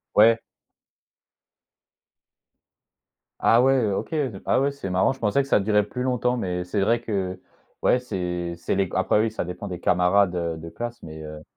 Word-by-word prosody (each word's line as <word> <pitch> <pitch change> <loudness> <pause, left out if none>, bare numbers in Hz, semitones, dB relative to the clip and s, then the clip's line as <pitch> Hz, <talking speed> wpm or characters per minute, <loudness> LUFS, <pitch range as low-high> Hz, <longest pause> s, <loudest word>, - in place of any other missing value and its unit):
Ouais. 115 +2 +6 3.0
Ah 115 +1 +5
ouais, 130 -5 +3
OK, 95 - -3
heu, 135 -11 -2
ah - - +2
ouais, 140 +1 +1
c'est 140 -9 -6
marrant, 90 +4 +2
je 135 - -8
pensais 110 +5 +2
que 135 - -6
ça - - +4
durait 105 +1 +2
plus 125 +5 -5
longtemps. 125 -1 0
Mais 90 -5 -2
c'est 90 +3 -2
vrai 115 +4 +2
que, 95 -5 -3 0.4
ouais, 125 - +3
c'est 90 -7 -3
c'est 85 - -2
les 95 0 +2
c 90 - -11
après 95 +2 +2
oui, 110 +1 +1
ça 110 - -3
dépend 90 +3 -6
des 90 -3 -5
camarades, 90 +1 +3
heu, 85 -2 -2
de 80 +1 -8
classe 120 +5 -6
mais, 80 -1 -9
heu 75 0 -9
100 Hz, 185 wpm, -24 LUFS, 90-120 Hz, 3.0 s, Ouais